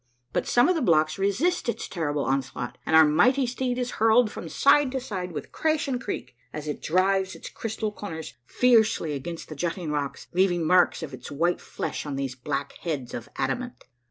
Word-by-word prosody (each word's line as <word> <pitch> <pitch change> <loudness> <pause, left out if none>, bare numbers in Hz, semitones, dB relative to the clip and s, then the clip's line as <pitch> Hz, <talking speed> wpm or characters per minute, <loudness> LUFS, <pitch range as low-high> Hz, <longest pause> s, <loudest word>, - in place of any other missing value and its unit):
But - - 0
some 245 +3 +4
of 365 - +4
the 330 - -1
blocks 155 - +3
resist 225 - +1
its - - -3
terrible 150 -5 -2
onslaught 130 -2 -2
and 160 - +3
our 160 0 +9
mighty 250 - +4
steed 250 0 -2
is 250 0 -2
hurled 225 0 +5
from 165 - -7
side 280 - +4
to 265 - 0
side 185 -7 -5
with 155 - -6
crash 315 -2 0
and 255 -2 -2
creak, 125 - -5 0.2
as 150 0 -6
it 150 - -4
drives 190 +2 +1
its - - -9
crystal 220 -1 -3
corners 165 -7 -7
fiercely 220 - +3
against 165 +4 -6
the 155 - -8
jutting 170 +1 -3
rocks, 145 -2 -3
leaving 175 -2 +2
marks 180 0 +4
of 145 -4 -6
its 125 -1 -8
white 170 +5 0
flesh - - -4
on 145 - -3
these 135 -2 -2
black 140 +2 -4
heads 145 -8 -4
of 120 - -6
adamant. 245 0 -3
175 Hz, 195 wpm, -26 LUFS, 150-240 Hz, 0.2 s, our